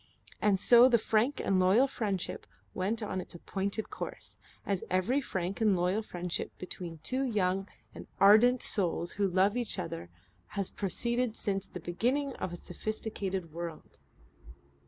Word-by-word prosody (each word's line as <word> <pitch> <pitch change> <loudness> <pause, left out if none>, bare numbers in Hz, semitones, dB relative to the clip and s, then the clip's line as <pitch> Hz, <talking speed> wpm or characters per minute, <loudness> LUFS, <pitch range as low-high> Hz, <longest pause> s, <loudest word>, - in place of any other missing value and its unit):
And 205 -2 +3
so 240 +5 +7
the 240 - +5
frank 225 +5 +1
and 190 -1 +2
loyal 190 +8 +5
friendship 205 -8 -3 0.3
went 215 +5 -1
on 190 -3 -2
its - - -10
appointed 195 +4 -3
course, - - -7 0.3
as 195 -3 -1
every 215 +10 +2
frank 190 -5 -3
and 210 -3 +4
loyal 180 +5 +1
friendship 180 -4 -5
between 175 -2 -6
two 255 +10 -1
young 195 -6 0 0.3
and - - -10
ardent 220 +5 +6
souls 175 -3 -1
who 200 0 +1
love 190 +3 +3
each 240 -4 -1
other 165 - -5 0.5
has 200 -2 -1
proceeded 235 +4 0
since 195 -1 -2
the 180 - -8
beginning 250 - 0
of 185 - -3
a - - -5
sophisticated 190 -2 -4
world. 170 -1 -7
195 Hz, 150 wpm, -31 LUFS, 180-225 Hz, 0.5 s, so